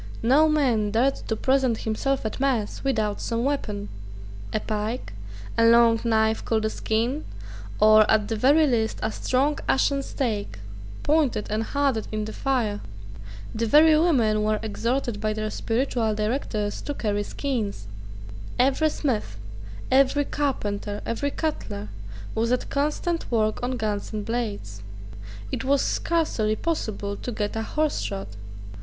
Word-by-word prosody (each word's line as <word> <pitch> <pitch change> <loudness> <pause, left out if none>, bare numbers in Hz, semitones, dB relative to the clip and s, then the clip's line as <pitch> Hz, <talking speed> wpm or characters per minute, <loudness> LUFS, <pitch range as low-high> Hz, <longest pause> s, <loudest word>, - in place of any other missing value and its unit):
No 285 +7 +5
man 250 -9 +2
dared 240 +6 +2
to 220 - 0
present 260 -1 +1
himself 260 +4 -1
at 220 - -3
mass 255 -6 0
without 220 -6 0
some 230 0 -1
weapon, 215 -7 -2 0.6
a 215 - 0
pike, 215 - -3 0.5
a - - +5
long 230 0 +6
knife 220 -1 +2
called 220 -1 0
a 220 - 0
skean, 235 +7 -1 0.6
or, 215 0 +6
at 210 -1 +3
the 225 - -1
very 285 +8 +5
least, 230 -5 +1
a 220 - 0
strong 275 +6 0
ashen 275 +1 +2
stake, 220 - -3 0.5
pointed 290 -8 +2
and 215 +1 0
hardened 270 -2 0
in 215 -1 -2
the 215 - -6
fire. 235 -7 -1 0.7
The 230 +1 -1
very 310 +6 +7
women 250 -10 +3
were 215 0 +1
exhorted 230 +1 -2
by 215 0 0
their 215 0 -3
spiritual 230 -2 0
directors 215 -1 -2
to 290 - -4
carry 205 -4 -1
skeans. 210 - -3 0.7
Every 275 +5 +3
smith, 220 - -2 0.5
every 275 +2 +4
carpenter, 205 -9 -2
every 285 +5 -1
cutler, 190 - -4 0.4
was 230 +2 0
at 250 - -1
constant 300 +4 -1
work 215 -2 +1
on 250 +1 -2
guns 210 -2 -2
and 210 -2 -4
blades. 205 - -3 0.7
It - - -2
was 275 +1 +2
scarcely 275 -11 0
possible 215 -9 -2
to 245 - -5
get 210 -2 -3
a 225 - -1
horse 305 +6 0
shod. 195 -2 -4
230 Hz, 145 wpm, -25 LUFS, 215-275 Hz, 0.7 s, very